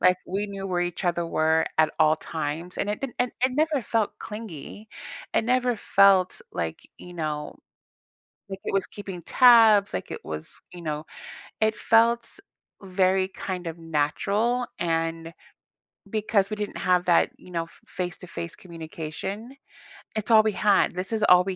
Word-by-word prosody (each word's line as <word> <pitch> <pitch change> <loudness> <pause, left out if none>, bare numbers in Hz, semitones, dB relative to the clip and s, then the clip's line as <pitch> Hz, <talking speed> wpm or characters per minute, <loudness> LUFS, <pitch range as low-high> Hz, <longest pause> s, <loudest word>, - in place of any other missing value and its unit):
Like, 180 +1 +5
we 200 +3 -2
knew 195 -1 -6
where 180 -2 -1
each 175 +1 -3
other 175 -1 0
were 160 0 +2
at 160 0 +4
all 155 +1 +5
times, 160 +2 -5
and 205 - -1
it 210 - -3
didn 270 -3 -4
and 245 0 0
it 255 - +2
never 300 0 +1
felt 225 -1 -1
clingy. 210 -1 -8 0.5
It - - +2
never 250 0 +2
felt 195 -2 +4
like, 85 -2 -4
you 180 - -11
know 155 -3 -4 0.9
like 195 - -6
it - - -3
was 195 -1 +1
keeping 195 -4 -8
tabs, 225 -4 +6
like 95 - -4
it - - -7
was 80 0 -6 0.2
you 175 - -9
know, 155 -1 -4 0.6
it 220 0 +2
felt 230 +1 +3 0.5
very 190 0 +2
kind 185 -2 -5
of 165 -1 -4
natural, 200 +10 0
and 165 0 -2 0.8
because 210 -1 +1
we 215 - -3
didn't 210 -1 -4
have 180 -1 +2
that, 175 -1 +4
you 180 - -15
know, 170 -1 -1
f 165 - -19
face 180 0 -4
to 180 - -11
face 170 0 -6
communication, 170 - -7 0.6
it's 215 +2 -2
all 215 -1 +8
we 215 - +2
had, 200 -1 +3
this 185 +4 -3
is 220 -1 0
all 180 0 +8
we 190 -1 -2
185 Hz, 170 wpm, -25 LUFS, 165-215 Hz, 0.9 s, all